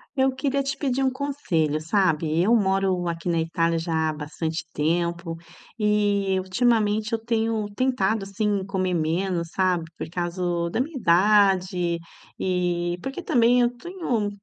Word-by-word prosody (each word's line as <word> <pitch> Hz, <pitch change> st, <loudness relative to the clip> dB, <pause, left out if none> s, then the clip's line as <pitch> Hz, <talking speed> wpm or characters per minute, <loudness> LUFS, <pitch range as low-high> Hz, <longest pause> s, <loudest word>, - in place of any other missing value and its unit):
Eu 265 Hz, 0 st, +2 dB
queria 275 Hz, +1 st, 0 dB
te 275 Hz, 0 st, -2 dB
pedir 270 Hz, -1 st, 0 dB
conselho, 255 Hz, -, -1 dB
sabe, 160 Hz, -2 st, +1 dB
eu 220 Hz, +6 st, +4 dB
moro 190 Hz, -3 st, +1 dB
aqui 165 Hz, +1 st, -3 dB
na 170 Hz, -1 st, +1 dB
Itália 165 Hz, +1 st, 0 dB
já 160 Hz, -1 st, 0 dB
há -, -, -2 dB
bastante 155 Hz, +2 st, -4 dB
tempo 170 Hz, +2 st, -1 dB, 0.4 s
e 205 Hz, -3 st, +1 dB
ultimamente 215 Hz, +1 st, +1 dB
eu 225 Hz, -, +1 dB
tenho 225 Hz, -2 st, 0 dB
tentado, 220 Hz, -5 st, +1 dB
assim, 200 Hz, 0 st, -1 dB
comer 185 Hz, -2 st, -1 dB
menos, 170 Hz, +1 st, -1 dB
sabe, 185 Hz, -3 st, +1 dB
por -, -, -6 dB
causa 175 Hz, 0 st, -2 dB
da 205 Hz, -, 0 dB
minha 295 Hz, +2 st, -4 dB
idade 185 Hz, -3 st, +3 dB, 0.4 s
e 175 Hz, -1 st, 0 dB
porque 270 Hz, +6 st, -4 dB
também 245 Hz, -5 st, +3 dB
eu 240 Hz, -, +4 dB
tenho 255 Hz, -, -2 dB
190 Hz, 140 wpm, -24 LUFS, 170-225 Hz, 0.4 s, eu